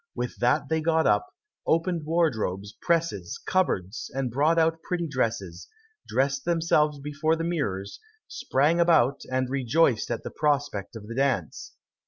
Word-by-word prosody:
With - - -4
that - - +2
they 160 0 0
got 160 0 +2
up, 105 -1 +3 0.4
opened 165 -1 +1
wardrobes, 110 - 0
presses, 165 - 0
cupboards, 110 - -1
and 135 -3 -1
brought 150 +7 +2
out 165 0 +2
pretty 175 -2 -2
dresses; 115 - -2 0.4
dressed 135 +1 0
themselves 160 -3 +2
before 150 +3 0
the 165 - -3
mirrors, 105 - -3 0.3
sprang 150 +6 +1
about, 155 -6 +4
and 130 0 0
rejoiced 135 -1 +1
at 120 - -3
the - - -6
prospect 145 -8 -1
of 110 -2 -8
the 115 - -6
dance. 130 - -1
140 Hz, 145 wpm, -26 LUFS, 115-165 Hz, 0.4 s, about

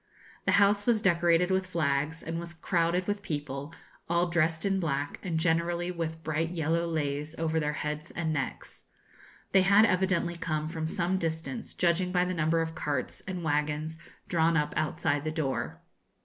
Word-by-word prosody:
The 195 - +3
house 200 +1 +4
was 235 -2 +4
decorated 175 -2 +3
with 190 0 +1
flags, 155 -2 0
and 165 +1 -3
was 170 0 -7
crowded 170 +1 +1
with 205 +1 -2
people, 145 -3 -4 0.4
all 170 +1 +2
dressed 165 0 +1
in 195 -1 +2
black, 145 -4 -2
and 175 -4 -2
generally 170 +1 +1
with 160 -2 -4
bright 160 +1 0
yellow 165 0 0
leis 150 -1 -2
over 160 0 0
their 150 -1 -1
heads 150 +2 -4
and 160 -2 -2
necks. 135 -3 -4 0.7
They 190 - +6
had 200 +3 +6
evidently 185 -3 +1
come 155 -2 -2
from 160 -1 -3
some 180 +3 0
distance, 160 -5 -4
judging 180 +1 +2
by 180 -1 +3
the 185 - -1
number 165 -1 +2
of 160 0 -5
carts 145 -5 -3
and 180 -2 -4
wagons 150 +1 -1 0.3
drawn 165 -1 +3
up 150 -1 0
outside 155 -1 0
the 155 - -1
door. 155 -4 -2
165 Hz, 170 wpm, -29 LUFS, 155-180 Hz, 0.7 s, They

